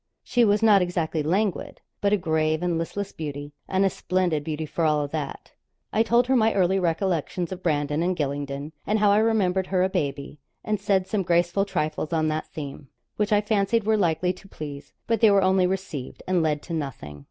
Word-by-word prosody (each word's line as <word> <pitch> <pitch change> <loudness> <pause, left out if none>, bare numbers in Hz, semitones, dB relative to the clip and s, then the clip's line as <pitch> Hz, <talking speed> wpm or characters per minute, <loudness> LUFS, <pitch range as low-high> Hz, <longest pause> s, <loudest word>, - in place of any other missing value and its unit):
She 245 - +2
was 210 0 +3
not 210 -3 +6
exactly 170 -3 -1
languid, 185 +5 -1 0.2
but 200 - +2
a 210 - +4
grave 160 -2 0
and 175 -2 0
listless 195 +4 -4
beauty, 145 -2 -6
and 190 +1 +2
a - - +4
splendid 175 -5 0
beauty 155 0 -3
for 165 +2 -3
all 150 -2 +2
that. 150 -2 -5 0.4
I 220 - +3
told 235 +2 +3
her 260 +1 +2
my 225 -2 +3
early 190 0 +3
recollections 175 0 -1
of 185 -1 -6
Brandon 150 -2 0
and 180 +1 0
Gylingden, 140 0 -3 0.2
and 215 - +2
how 210 -1 +4
I 205 - +4
remembered 190 -4 +1
her 185 -1 +1
a 190 - +2
baby, 140 -3 -3 0.2
and 210 -1 -1
said 195 -2 +1
some 195 +2 -1
graceful 175 +2 +2
trifles 155 -4 -2
on 155 -1 +1
that 155 0 -2
theme, 140 -2 -7 0.3
which 210 +1 0
I 210 -1 +4
fancied 210 +1 +1
were 220 +1 +2
likely 180 -2 +1
to 190 +2 -16
please. 145 -5 -8
But 230 -2 0
they 220 - +7
were 200 -1 +4
only 185 -1 +3
received, 180 -8 -5
and 185 -2 +2
led 150 -2 0
to 170 - -7
nothing. 130 - -5
180 Hz, 205 wpm, -25 LUFS, 155-200 Hz, 0.4 s, they